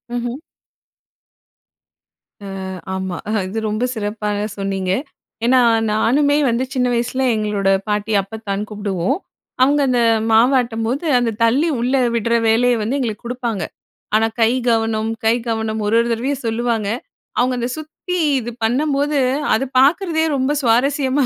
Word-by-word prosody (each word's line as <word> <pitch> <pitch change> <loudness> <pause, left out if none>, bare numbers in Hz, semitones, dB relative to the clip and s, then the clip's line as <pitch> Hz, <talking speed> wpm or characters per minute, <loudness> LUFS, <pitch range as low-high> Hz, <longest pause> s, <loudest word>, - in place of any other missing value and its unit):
ம்ஹ்ம். 240 +2 -3 2.1
அ - - -6 0.5
ஆமா. 190 -2 -3 0.3
இது 210 +4 -3
ரொம்ப 215 +3 -1
சிறப்பாக 210 -2 -2
சொன்னீங்க. 195 -2 -2 0.5
ஏன்னா, 255 +2 +5 0.3
"நானுமே 285 +7 +2
வந்து 235 +2 0
சின்ன 250 -2 +1
வயசில 240 +2 -1
எங்களோட 210 -2 0 0.2
பாட்டி, 210 +1 -1
அப்பத்தான்னு 205 0 -5
கூப்டுவோம். 205 - -1 0.4
அவுங்க 285 +3 +4
அந்த 245 -1 +2 0.3
மாவாட்டும்போது, 240 +3 +2
அந்த 240 -2 0
தள்ளி 265 +9 +3
உள்ளே 255 +3 +1 0.2
உட்ற 230 +2 0
வேலைய 240 +2 +3
வந்து 230 +6 -1
எங்களுக்கு 230 -4 -3
குடுப்பாங்க. 235 -4 -3 0.5
ஆனா, 220 +1 +4
கை 225 +1 +5 0.2
கவனம், 225 -1 +1 0.2
கை 225 +1 +4
கவனம் 220 -1 -2
ஒரு 215 - +2
ஒரு 235 - +1
தடவையும் 255 +4 -2
சொல்லுவாங்க." 225 -2 -1 0.5
அவுங்க 250 +1 +2
அந்த 240 +1 -2
சுத்தி 315 +4 -5 0.2
இது 240 0 -5
பண்ணம்போது, 285 +4 +1 0.4
அது 265 - 0
பாக்குறதே 320 +3 +3
ரொம்ப 265 +1 0
சுவாரஸ்யமா 265 +3 +2
235 Hz, 125 wpm, -19 LUFS, 220-260 Hz, 2.1 s, ஏன்னா